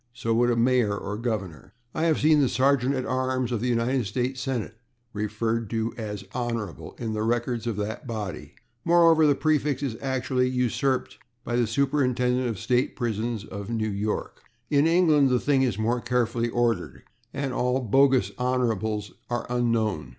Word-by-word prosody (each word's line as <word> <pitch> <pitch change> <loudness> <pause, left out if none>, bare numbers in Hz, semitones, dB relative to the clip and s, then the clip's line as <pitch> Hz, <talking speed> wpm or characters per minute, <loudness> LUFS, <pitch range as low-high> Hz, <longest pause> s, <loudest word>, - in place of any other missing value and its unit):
So 115 -2 -1
would 120 +2 +3
a 120 - +2
mayor 115 -3 +2
or 100 0 -4
governor. 105 -5 -4 0.2
I 160 - 0
have 160 -2 +2
seen 155 -1 +4
the 135 - +2
sergeant 135 +1 +2
at 130 - -2
arms 130 -1 -1
of 115 -3 -1
the 125 - -1
United 120 0 +1
States 125 +5 -2
Senate 125 -5 -3 0.4
referred 105 +1 -2
to 115 0 -2
as 105 -4 -5
/Hon./ 115 -6 -4
in 115 -2 -3
the 105 - -2
records 120 +1 -1
of 115 - -1
that 110 +6 -4
body. 105 -8 -5 0.3
More, 170 -1 +6
the 145 -2 +5
prefix 150 -2 0
is 130 -5 -2
actually 130 -1 0
usurped 130 +1 -1 0.2
by 120 - -2
the 120 -1 +2
Superintendent 125 0 +1
of 115 -4 -3
State 125 +5 0
Prisons 115 -2 -2
of 100 0 -7
New 110 -2 -1
York. 105 +2 -3 0.3
In 145 +1 +4
England 160 -5 +4
the 125 -1 +2
thing 140 0 +2
is 125 -7 +1
more 115 +3 0
carefully 120 -1 0
ordered, 120 0 -1 0.3
and 140 -1 -3
bogus 125 -2 +2
/Hons./ 110 -3 -1 0.2
are 120 0 -2
unknown. 110 - 0
120 Hz, 165 wpm, -26 LUFS, 110-130 Hz, 0.4 s, More